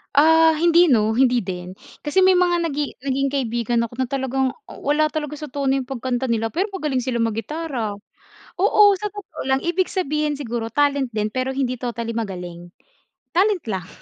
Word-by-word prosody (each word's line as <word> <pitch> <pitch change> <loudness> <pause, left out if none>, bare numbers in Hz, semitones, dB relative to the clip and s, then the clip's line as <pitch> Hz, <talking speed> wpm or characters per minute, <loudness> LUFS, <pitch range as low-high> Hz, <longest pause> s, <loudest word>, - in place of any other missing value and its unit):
Ah, 320 +2 +6
hindi 340 -1 +5
no, 220 -1 +3
hindi 250 -1 +4
din 180 -2 -6 0.3
kasi 295 +5 +1
may 375 0 +6
mga 350 -1 +2
nagi 295 -1 -4
naging 275 +1 -1
kaibigan 240 -3 0
ako 230 - -18
na 260 0 -1
talagang 265 -1 0 0.2
uh - - -11
wala 300 +2 +2
talaga 300 -1 -5
sa 300 - -6
tono 275 0 -1
yung 255 - -6
pagkanta 260 -1 -2
nila. 225 -1 0
Pero 380 +6 0
magaling 300 -7 -1
sila 250 -1 -2
mag-gitara. 230 0 -3 0.7
Oo, 420 +1 +5 0.2
sa 420 - -2
totoo 395 -6 -9
lang 265 0 +1
ibig 350 +2 +1
sabihin 300 -5 -1
siguro 235 -4 -4
talent 280 +2 +1
din 210 0 -1
pero 260 +1 -1
hindi 255 -3 -1
totally 235 -2 -3
magaling, 180 -6 -5 0.6
talent 385 +1 +2
lang. 190 -6 -4
265 Hz, 175 wpm, -22 LUFS, 235-310 Hz, 0.7 s, Ah